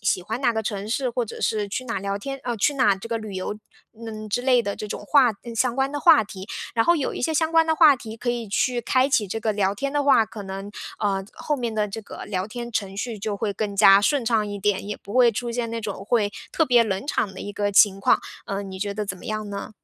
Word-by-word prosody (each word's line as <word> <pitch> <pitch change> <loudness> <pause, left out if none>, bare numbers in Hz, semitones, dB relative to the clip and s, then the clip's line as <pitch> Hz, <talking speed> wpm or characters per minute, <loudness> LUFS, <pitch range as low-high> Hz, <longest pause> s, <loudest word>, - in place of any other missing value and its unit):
喜 180 - +1
欢 220 +6 -4
哪 245 -3 +3
个 220 - -1
城 205 -1 -4
市， 255 +2 0
或 245 0 -1
者 - - -9
是 210 -2 0
去 255 +6 -4
哪 230 -2 -4
儿 - - -2
聊 200 +1 -2
天 275 +4 -6
呃， 240 -2 -2
去 285 +8 +2
哪 250 -7 +3
这 195 +4 -9
个 230 - -1
旅 215 -3 -7
游， 190 +3 -4 0.4
嗯， 215 -1 -7
之 230 +4 -1
类 255 -1 +4
的 200 -3 -3
这 215 - -6
种 205 - -6
话 270 -5 +5
嗯， 235 -1 -7
相 240 +2 +1
关 270 +1 0
的 290 - -3
话 310 -9 +6
题。 195 0 -10 0.3
然 225 - +3
后 345 - +4
有 285 - -2
一 - - -5
些 320 - +1
相 320 +1 +1
关 325 0 +5
的 320 0 +1
话 300 -1 +8
题 225 -3 -9
可 245 - -5
以 240 -2 -2
去 240 +5 +1
开 255 +3 +2
启 215 -7 +1
这 225 - -3
个 220 -1 0
聊 200 -2 +1
天 275 +7 -3
的 290 0 +1
话， 275 -6 +5
可 215 -1 -8
能， 195 +1 -6 0.3
呃， 195 -2 0
后 295 -1 -2
面 240 -3 -3
的 215 -1 0
这 210 +2 -7
个 - - -9
聊 185 -2 -2
天 240 +1 -6
程 195 -3 -2
序 220 0 -4
就 205 0 -2
会 205 0 -2
更 200 -1 -3
加 195 -1 +8
顺 260 +4 +2
畅 225 -2 +2
一 205 0 -5
点， 200 -1 0
也 210 - -3
不 200 - -11
会 250 -2 +6
出 235 +2 -4
现 235 -1 -2
那 230 0 -3
种 205 -3 -5
会 210 -2 +1 0.2
特 320 - +1
别 245 -2 +5
冷 215 +3 -3
场 205 -9 -1
的 190 - -11
一 205 - -6
个 205 0 -1
情 195 -1 +5
况， - - +3 0.3
呃， 200 0 -3
你 190 -1 -8
觉 205 0 -1
得 210 0 -4
怎 185 - -4
么 - - -12
样 215 -1 -3
呢？ 200 0 -6
220 Hz, 305 characters per minute, -24 LUFS, 200-245 Hz, 0.4 s, 话